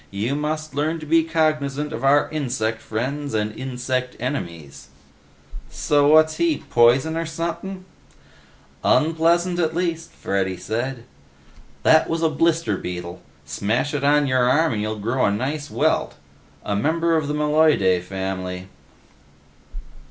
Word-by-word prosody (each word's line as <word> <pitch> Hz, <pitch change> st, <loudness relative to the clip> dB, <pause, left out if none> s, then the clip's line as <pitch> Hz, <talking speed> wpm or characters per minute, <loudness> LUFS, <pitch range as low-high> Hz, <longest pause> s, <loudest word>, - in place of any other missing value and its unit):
You 105 Hz, +7 st, -2 dB
must 155 Hz, +1 st, -3 dB
learn 155 Hz, +4 st, -1 dB
to 155 Hz, -, -8 dB
be 165 Hz, +2 st, +3 dB
cognizant 150 Hz, -3 st, 0 dB
of -, -, -5 dB
our 140 Hz, +2 st, +4 dB
insect 120 Hz, -7 st, -2 dB
friends 135 Hz, +4 st, -3 dB
and 105 Hz, 0 st, -1 dB
insect 130 Hz, 0 st, -3 dB
enemies." 85 Hz, -, -5 dB, 0.8 s
"So 145 Hz, -1 st, +2 dB
what's 155 Hz, +1 st, +5 dB
he, 335 Hz, -2 st, 0 dB
poison 125 Hz, +7 st, +4 dB
or 165 Hz, 0 st, -2 dB
sumpin'?" 170 Hz, +4 st, -5 dB, 1.0 s
"Unpleasant, 170 Hz, +3 st, +2 dB
at 160 Hz, -1 st, 0 dB
least," 170 Hz, -2 st, -2 dB
Freddy 95 Hz, -1 st, -2 dB
said. 115 Hz, +6 st, -4 dB, 0.8 s
"That 160 Hz, 0 st, +5 dB
was 165 Hz, 0 st, -1 dB
a 160 Hz, -, +4 dB
blister 160 Hz, -, +1 dB
beetle; 90 Hz, -1 st, -6 dB, 0.2 s
smash 105 Hz, -, -1 dB
it 145 Hz, -1 st, -2 dB
on 145 Hz, +1 st, +4 dB
your 130 Hz, -2 st, +2 dB
arm 160 Hz, +2 st, +3 dB
and 105 Hz, -, -2 dB
you'll 110 Hz, +1 st, -2 dB
grow 115 Hz, +5 st, -1 dB
a 100 Hz, -, +2 dB
nice 140 Hz, +8 st, -3 dB
welt. -, -, 0 dB, 0.5 s
A 105 Hz, -, -1 dB
member 165 Hz, +9 st, +1 dB
of 155 Hz, -3 st, 0 dB
the 150 Hz, -, -2 dB
Meloidae 150 Hz, -, +3 dB
family." 95 Hz, 0 st, -5 dB
140 Hz, 135 wpm, -22 LUFS, 110-160 Hz, 1.0 s, what's